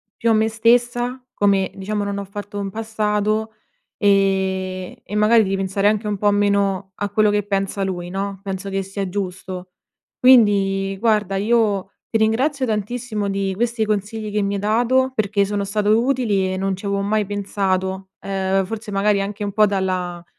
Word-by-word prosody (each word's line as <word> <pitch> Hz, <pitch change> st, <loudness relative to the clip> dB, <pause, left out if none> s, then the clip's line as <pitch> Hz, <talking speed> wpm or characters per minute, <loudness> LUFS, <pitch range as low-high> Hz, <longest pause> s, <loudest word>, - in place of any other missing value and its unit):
più 230 Hz, -, 0 dB
a 225 Hz, -, +5 dB
me 220 Hz, +1 st, +3 dB
stessa, 240 Hz, +2 st, +2 dB
come 195 Hz, -2 st, +2 dB
diciamo 205 Hz, +2 st, -3 dB
non 200 Hz, 0 st, -3 dB
ho 200 Hz, -, -5 dB
fatto 205 Hz, +1 st, -7 dB
in 195 Hz, -, -3 dB
passato 215 Hz, 0 st, -1 dB, 0.4 s
e 190 Hz, -2 st, 0 dB
e 205 Hz, -, -7 dB
magari 215 Hz, +2 st, +5 dB
di 195 Hz, -, 0 dB
ripensare 195 Hz, +1 st, 0 dB
anche 215 Hz, 0 st, +1 dB
un 210 Hz, -1 st, -1 dB
po' 205 Hz, -, +3 dB
meno 200 Hz, -1 st, +1 dB
a 205 Hz, +2 st, -3 dB
quello 210 Hz, 0 st, +3 dB
che 205 Hz, -, +2 dB
pensa 195 Hz, -1 st, -2 dB
lui 175 Hz, -2 st, -3 dB
no, 195 Hz, 0 st, -3 dB
penso 195 Hz, 0 st, -4 dB
che 195 Hz, 0 st, -1 dB
sia 195 Hz, 0 st, -4 dB
giusto. 185 Hz, -1 st, -5 dB, 0.5 s
Quindi 200 Hz, -6 st, +4 dB
guarda 210 Hz, -4 st, +1 dB
io 205 Hz, -2 st, +1 dB, 0.2 s
ti 225 Hz, -, +1 dB
ringrazio 260 Hz, +6 st, +1 dB
tantissimo 215 Hz, -1 st, -2 dB
di 195 Hz, -1 st, -1 dB
questi 235 Hz, 0 st, 0 dB
consigli 215 Hz, +1 st, -2 dB
che 210 Hz, -, 0 dB
mi 200 Hz, -, -1 dB
hai -, -, -2 dB
dato 245 Hz, +5 st, +2 dB
perché 205 Hz, -3 st, +1 dB
sono 205 Hz, 0 st, -2 dB
stato 210 Hz, +2 st, +2 dB
utili 225 Hz, -8 st, +1 dB
e 185 Hz, -, -3 dB
non 195 Hz, 0 st, -1 dB
ci 195 Hz, +2 st, -10 dB
avevo 200 Hz, 0 st, 0 dB
mai 210 Hz, +1 st, +1 dB
pensato. 190 Hz, -1 st, -2 dB
Ehm, 195 Hz, 0 st, 0 dB
forse 215 Hz, +1 st, -6 dB
magari 200 Hz, 0 st, +2 dB
anche 205 Hz, +1 st, -4 dB
un 200 Hz, -, -2 dB
po' 215 Hz, +1 st, +4 dB
dalla 185 Hz, -3 st, -2 dB
205 Hz, 175 wpm, -21 LUFS, 195-215 Hz, 0.5 s, a